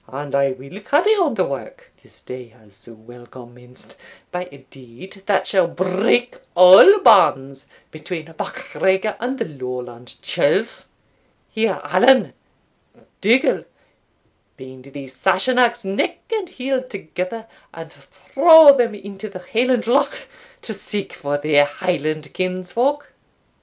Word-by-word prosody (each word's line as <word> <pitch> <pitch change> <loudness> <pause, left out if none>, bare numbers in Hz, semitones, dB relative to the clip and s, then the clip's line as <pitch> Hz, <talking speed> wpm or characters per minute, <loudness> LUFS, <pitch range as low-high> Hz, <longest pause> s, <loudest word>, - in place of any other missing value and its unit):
And 140 +1 -8
I 140 0 +1
will 135 +9 -12
carry 300 - +1
on 350 - 0
the 185 - 0
work, 140 - -9
this - - -19
day 125 -1 -10
has 110 -2 -24
so 115 +4 -14
well 120 +2 -16
commenced, 125 0 -15 0.3
by 180 0 -5
a 140 -1 -17
deed 135 - -15
that 205 - +1
shall 185 -4 +1
break 190 +8 -1 0.2
all 185 - +8
bands 135 - +3 0.2
between 160 0 -8
MacGregor 210 -5 -2
and 255 +3 -4
the - - -3
Lowland 125 -4 -9
churls. - - -1 0.6
Here 220 -3 -1
Allan 240 - +3 0.9
Dougal 235 +6 +1 0.9
bind 130 -1 -13
these 135 -1 -12
Sassenachs 235 - +1
neck 195 +1 -2 0.2
and 415 -5 -3
heel 260 0 -3
together, 200 -1 -7 0.3
and 165 -1 -12
throw 285 - +5
them 235 -4 0
into 200 +1 -10
the 185 -2 -11
Highland 245 +1 +1
Loch 255 +5 -1 0.4
to 220 - -6
seek 205 0 -6
for 145 0 -4
their 145 0 +2
Highland 155 -1 -4
kinsfolk." 185 +10 -3
185 Hz, 125 wpm, -19 LUFS, -, 0.9 s, all